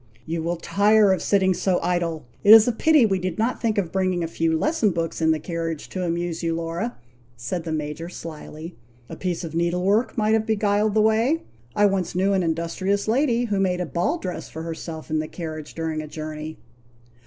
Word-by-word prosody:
"You 165 Hz, 0 st, -3 dB
will 170 Hz, +2 st, -1 dB
tire 205 Hz, +3 st, +3 dB
of 190 Hz, -, -2 dB
sitting 190 Hz, -2 st, +3 dB
so 185 Hz, +1 st, 0 dB
long -, -, +1 dB
idle! 170 Hz, -3 st, -1 dB, 0.2 s
It 210 Hz, +2 st, +10 dB
is 225 Hz, +1 st, +7 dB
a -, -, +4 dB
pity 300 Hz, +2 st, +4 dB
we 195 Hz, -3 st, +1 dB
did 180 Hz, -2 st, -3 dB
not 230 Hz, +3 st, 0 dB
think 225 Hz, -3 st, 0 dB
of 180 Hz, -5 st, 0 dB
bringing 185 Hz, -2 st, 0 dB
a -, -, -1 dB
few 165 Hz, 0 st, 0 dB
lesson 295 Hz, -, +1 dB
books 165 Hz, -2 st, -3 dB
in 160 Hz, -, +3 dB
the 160 Hz, -, +3 dB
carriage 165 Hz, -1 st, -4 dB
to 185 Hz, -, -3 dB
amuse 170 Hz, -1 st, -2 dB
you, 165 Hz, -1 st, -1 dB
Laura," 170 Hz, +8 st, -3 dB, 0.4 s
said 160 Hz, +9 st, -4 dB
the 165 Hz, -, -3 dB
Major, 155 Hz, +2 st, -4 dB
slyly. 165 Hz, 0 st, -8 dB, 0.3 s
"A -, -, -6 dB
piece 180 Hz, -1 st, -3 dB
of 165 Hz, -2 st, -6 dB
needle 170 Hz, +2 st, 0 dB
work 210 Hz, +7 st, +1 dB
might 215 Hz, 0 st, +2 dB
have 220 Hz, 0 st, +1 dB
beguiled 210 Hz, -1 st, +1 dB
the 215 Hz, -, +5 dB
way. 225 Hz, +9 st, +2 dB, 0.3 s
I 205 Hz, -, +4 dB
once 195 Hz, -3 st, 0 dB
knew 195 Hz, +2 st, +2 dB
an 190 Hz, -, +2 dB
industrious 170 Hz, +5 st, -1 dB
lady 240 Hz, 0 st, +2 dB
who 205 Hz, -4 st, -1 dB
made 185 Hz, -2 st, +1 dB
a 180 Hz, -, -1 dB
ball 175 Hz, -, -1 dB
dress 180 Hz, -, -6 dB
for 160 Hz, -, -7 dB
herself 160 Hz, -1 st, -7 dB
in 155 Hz, -, +1 dB
the 155 Hz, -, -3 dB
carriage 155 Hz, -2 st, -7 dB
during 160 Hz, -1 st, -2 dB
a 155 Hz, -, -8 dB
journey." 155 Hz, 0 st, -6 dB
180 Hz, 215 wpm, -23 LUFS, 165-205 Hz, 0.4 s, It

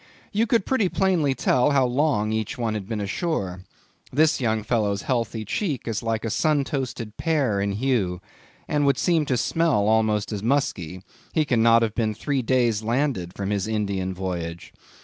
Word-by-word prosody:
You 220 Hz, +3 st, +1 dB
could 230 Hz, -4 st, +2 dB
pretty 225 Hz, -8 st, +1 dB
plainly 175 Hz, -9 st, +1 dB
tell 125 Hz, +1 st, +2 dB
how 140 Hz, -3 st, +3 dB
long 125 Hz, -4 st, +1 dB
each 110 Hz, +1 st, -2 dB
one 115 Hz, -3 st, -1 dB
had 100 Hz, -3 st, -5 dB
been 110 Hz, -2 st, -2 dB
ashore. 100 Hz, -, -2 dB, 0.5 s
This 155 Hz, +1 st, +3 dB
young 110 Hz, -3 st, 0 dB
fellow's 105 Hz, -3 st, 0 dB
healthy 115 Hz, -3 st, -1 dB
cheek 145 Hz, -, -2 dB
is 115 Hz, -2 st, -2 dB
like 115 Hz, -1 st, -2 dB
a 110 Hz, -, -2 dB
sun 150 Hz, +2 st, +2 dB
toasted 120 Hz, -6 st, -4 dB
pear 140 Hz, -11 st, +1 dB
in 100 Hz, 0 st, -1 dB
hue, 105 Hz, -6 st, 0 dB, 0.5 s
and 150 Hz, -1 st, +1 dB
would 140 Hz, -, +3 dB
seem 165 Hz, -4 st, +2 dB
to 130 Hz, -, +1 dB
smell 150 Hz, -6 st, +1 dB
almost 110 Hz, -1 st, +2 dB
as 105 Hz, -2 st, -3 dB
musky; 95 Hz, -, -1 dB, 0.3 s
he 155 Hz, -2 st, +2 dB
cannot 115 Hz, -3 st, +4 dB
have 110 Hz, -2 st, -1 dB
been 110 Hz, -2 st, -1 dB
three 135 Hz, +5 st, -1 dB
days 120 Hz, -3 st, +1 dB
landed 115 Hz, -6 st, -1 dB
from 100 Hz, 0 st, -3 dB
his 100 Hz, -1 st, -1 dB
Indian 100 Hz, -4 st, -1 dB
voyage. 85 Hz, -3 st, -5 dB
115 Hz, 175 wpm, -24 LUFS, 105-140 Hz, 0.5 s, cannot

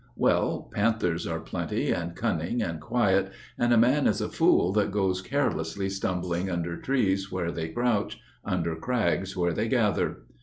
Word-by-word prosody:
Well, -, -, +1 dB
panthers 100 Hz, -6 st, 0 dB
are -, -, -2 dB
plenty -, -, -2 dB
and 85 Hz, 0 st, -2 dB
cunning 90 Hz, +8 st, -1 dB
and 85 Hz, -5 st, -4 dB
quiet, 95 Hz, -1 st, +1 dB, 0.2 s
And 120 Hz, 0 st, +1 dB
a 120 Hz, -, +5 dB
man 130 Hz, +5 st, +4 dB
is -, -, +1 dB
a -, -, -2 dB
fool 90 Hz, -, +3 dB
that 105 Hz, -1 st, +2 dB
goes 95 Hz, -2 st, 0 dB
carelessly 95 Hz, -, -1 dB
stumbling 90 Hz, -1 st, -2 dB
Under 85 Hz, -1 st, -2 dB
trees 100 Hz, -5 st, 0 dB
where 90 Hz, -2 st, -2 dB
they 80 Hz, -1 st, -4 dB
crouch, 120 Hz, +2 st, 0 dB, 0.2 s
under 85 Hz, -3 st, -1 dB
crags 95 Hz, -2 st, -1 dB
where 85 Hz, -1 st, +1 dB
they -, -, -1 dB
gather. -, -, +1 dB
95 Hz, 160 wpm, -27 LUFS, 85-110 Hz, 0.2 s, a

